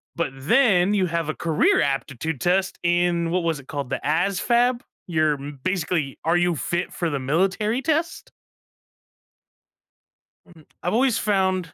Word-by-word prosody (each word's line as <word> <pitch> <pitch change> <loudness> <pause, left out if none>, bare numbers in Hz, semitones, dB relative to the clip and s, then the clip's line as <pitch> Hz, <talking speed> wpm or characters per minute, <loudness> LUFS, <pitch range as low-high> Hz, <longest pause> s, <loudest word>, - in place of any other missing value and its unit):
But 170 -4 -1
then 195 - +3
you 195 -3 +2
have 170 -2 -2
a - - 0
career 160 -3 +2
aptitude 140 +1 -2
test 185 +2 +1
in 175 -1 +1
what 180 +1 0
was 165 -3 -1
it 135 - -15
called? 140 -4 -5
The - - -3
ASVAB? 235 - +1 0.3
You're 155 -4 +1
basically 145 +1 -3
are 165 +2 +2
you 175 -1 +1
fit 175 +4 -3
for 170 - -2
the 145 -3 -2
military 190 - 0
test? 320 +3 -2 2.2
Mm, 160 -3 -18 0.2
I've 175 - -1
always 245 0 +2
found 190 -5 0
175 Hz, 145 wpm, -23 LUFS, 155-195 Hz, 2.2 s, then